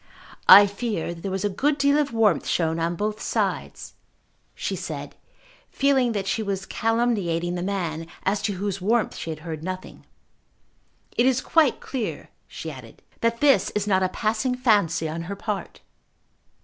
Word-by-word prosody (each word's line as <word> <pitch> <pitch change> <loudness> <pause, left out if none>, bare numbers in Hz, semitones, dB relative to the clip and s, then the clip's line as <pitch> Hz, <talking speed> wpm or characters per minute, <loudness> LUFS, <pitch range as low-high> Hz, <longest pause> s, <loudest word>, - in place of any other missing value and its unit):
"I 200 +2 +11
fear 200 -4 -3
there 170 +3 -6
was 190 +1 -2
a - - +4
good 280 +9 0
deal 280 +1 +3
of 290 -2 0
warmth 220 -5 +2
shown 165 -1 0
on 170 +1 -1
both 210 +2 -3
sides," - - -2 0.6
she - - -3
said, - - -6 0.5
feeling 265 -4 +2
that 200 -2 -2
she 220 - -1
was 195 -2 -3
calumniating 210 -7 0
the 175 - -3
man, 170 -4 -3 0.2
as 195 +1 0
to 205 0 -1
whose 195 0 -3
warmth 225 +4 +1
she - - -6
had 155 -1 -5
heard 160 -2 -6
nothing. 185 +1 -7 1.1
"It 240 - +3
is 260 -1 +3
quite 310 0 +2
clear," 250 -5 -5 0.2
she - - -7
added, - - -13 0.2
"that 230 0 0
this 275 -10 +4
is 210 -1 0
not 190 -2 +2
a 185 - +1
passing 225 +6 -1
fancy 205 -10 +2
on 160 +2 -4
her 200 - -3
part." 205 0 -5
205 Hz, 165 wpm, -24 LUFS, 180-235 Hz, 1.1 s, I